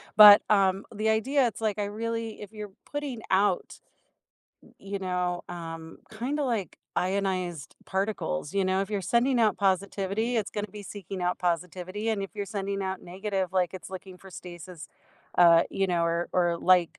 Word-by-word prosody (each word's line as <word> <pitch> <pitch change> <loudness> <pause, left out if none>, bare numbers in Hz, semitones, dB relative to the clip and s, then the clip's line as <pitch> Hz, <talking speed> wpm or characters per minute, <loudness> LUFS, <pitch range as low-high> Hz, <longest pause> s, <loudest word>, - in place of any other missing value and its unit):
But, 210 -1 +11
um, 195 -1 +3
the 215 +1 0
idea 255 +5 +3
it's 225 - -5
like, 215 -2 0
I 205 - 0
really 225 +2 -4
if 210 +1 -9
you're 210 -2 -7
putting 285 -6 -4
out, 190 -1 +1 1.0
you 200 0 -5
know, 180 -1 -1
um, 165 -1 -7
kinda 250 +7 -2
like 225 - -2 0.2
ionized 185 -5 -1
particles, 190 - -2
you 195 -1 +2
know. 185 +1 +1
If 195 +1 -3
you're 205 -2 -1
sending 240 +6 +2
out 220 -2 +3
positivity, 200 +4 0
it's 215 -3 -1
gonna 210 0 -3
be 210 +1 -9
seeking 195 -2 -7
out 180 0 0
positivity, 180 +4 -2
and 210 -3 -1
if 195 - -5
you're 205 - -2
sending 200 -1 -3
out 190 0 -3
negative, 190 0 -3
like, 185 -2 +1
it's 185 - -8
looking 190 -1 -9
for 190 +1 -13
stasis, 175 -3 -9 0.5
uh, 170 -1 +7
you 195 - 0
know, 175 -2 +1
or 170 +1 0
or, 175 -2 +2
like, 180 -2 +3
195 Hz, 175 wpm, -28 LUFS, 180-210 Hz, 1.0 s, But